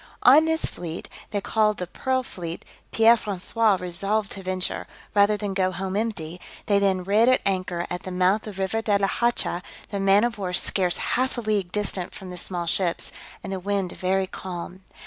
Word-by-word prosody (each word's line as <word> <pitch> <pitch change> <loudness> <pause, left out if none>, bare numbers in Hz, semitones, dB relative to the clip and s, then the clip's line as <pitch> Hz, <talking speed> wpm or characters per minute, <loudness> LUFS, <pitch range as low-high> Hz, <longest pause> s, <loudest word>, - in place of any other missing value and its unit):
On 290 +6 +8
this 320 0 +1
fleet, 170 -1 -6 0.4
called 215 -2 +2
the 180 - -3
pearl 260 +8 -1
fleet, 170 -7 -6 0.3
Pierre 225 +1 +6
François 210 0 +1
resolved 195 +4 -1
to 195 - -2
venture, 185 0 -1 0.3
rather 205 +1 +4
than 205 -2 -3
go 185 -1 +1
home 190 +1 -3
empty; 185 -6 -2 0.2
they 200 -1 +3
then 190 -2 +2
rid 210 +6 +4
at 255 - +5
anchor 185 -3 0
at 180 - -4
the - - -7
mouth 185 +4 +2
of 210 - -6
the 195 - -4
River 225 +4 -1
de 210 -2 +2
la 200 - +1
Hacha, 235 -6 0 0.3
the 200 - -2
man 195 +2 +5
of 235 -3 -1
war 185 -2 -3
scarce 180 0 +1 0.2
half 255 +1 0
a - - -1
league 210 -5 0
distant 200 -3 -2
from 185 -1 -8
the 180 - -7
small 175 0 -3
ships, 170 0 0 0.3
and 195 - -4
the 190 - -3
wind 195 -1 -1
very 190 +1 0
calm. 185 0 -7
195 Hz, 195 wpm, -25 LUFS, 180-215 Hz, 0.4 s, On